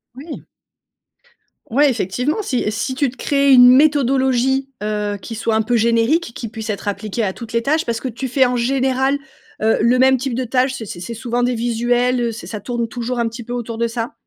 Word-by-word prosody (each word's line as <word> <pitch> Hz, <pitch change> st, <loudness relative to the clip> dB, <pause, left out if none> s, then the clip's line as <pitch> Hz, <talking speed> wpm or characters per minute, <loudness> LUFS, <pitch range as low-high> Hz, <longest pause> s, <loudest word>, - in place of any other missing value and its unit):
Oui. 290 Hz, +5 st, -9 dB, 1.2 s
Ouais 285 Hz, +6 st, +4 dB
effectivement 250 Hz, -, -1 dB
si 260 Hz, -11 st, -1 dB
si 260 Hz, +4 st, -3 dB
tu 270 Hz, -1 st, 0 dB
te -, -, -17 dB
crées 280 Hz, +2 st, +2 dB
une 245 Hz, -1 st, +9 dB
méthodologie, 265 Hz, -1 st, +3 dB
heu, 210 Hz, -1 st, -2 dB
qui 225 Hz, -, -7 dB
soit 225 Hz, 0 st, -1 dB
un 220 Hz, -, +3 dB
peu 240 Hz, +3 st, 0 dB
générique, 235 Hz, +5 st, +2 dB
qui 230 Hz, -, -6 dB
puisse 220 Hz, 0 st, -5 dB
être 200 Hz, 0 st, -6 dB
appliquée 210 Hz, +2 st, -3 dB
à 195 Hz, -, 0 dB
toutes 230 Hz, +3 st, -10 dB
les 230 Hz, -, +1 dB
tâches. 310 Hz, +6 st, 0 dB
Parce 230 Hz, -1 st, -2 dB
que -, -, -4 dB
tu 255 Hz, +2 st, -4 dB
fais 260 Hz, +1 st, +3 dB
en 250 Hz, -, -1 dB
général, 265 Hz, +2 st, +1 dB, 0.4 s
heu, 220 Hz, +1 st, +3 dB
le 240 Hz, +3 st, +3 dB
même 265 Hz, 0 st, +5 dB
type 260 Hz, 0 st, -3 dB
de 255 Hz, +2 st, -2 dB
tâches, 255 Hz, +2 st, +1 dB
c'est 230 Hz, -, -6 dB
c'est 175 Hz, -, -7 dB
c'est 180 Hz, +7 st, -6 dB
souvent 240 Hz, +1 st, -2 dB
des 250 Hz, +1 st, +1 dB
visuels, 240 Hz, +2 st, +1 dB
heu? 235 Hz, -, 0 dB
Ç 230 Hz, -, -9 dB
ça 215 Hz, -, -5 dB
tourne 235 Hz, +2 st, -3 dB
toujours 245 Hz, +1 st, -4 dB
un 235 Hz, -, +1 dB
petit 230 Hz, +1 st, -8 dB
peu 240 Hz, -, -6 dB
autour 235 Hz, -2 st, -4 dB
de 235 Hz, -, +1 dB
ça? 230 Hz, 0 st, -4 dB
245 Hz, 225 wpm, -19 LUFS, 230-265 Hz, 1.2 s, une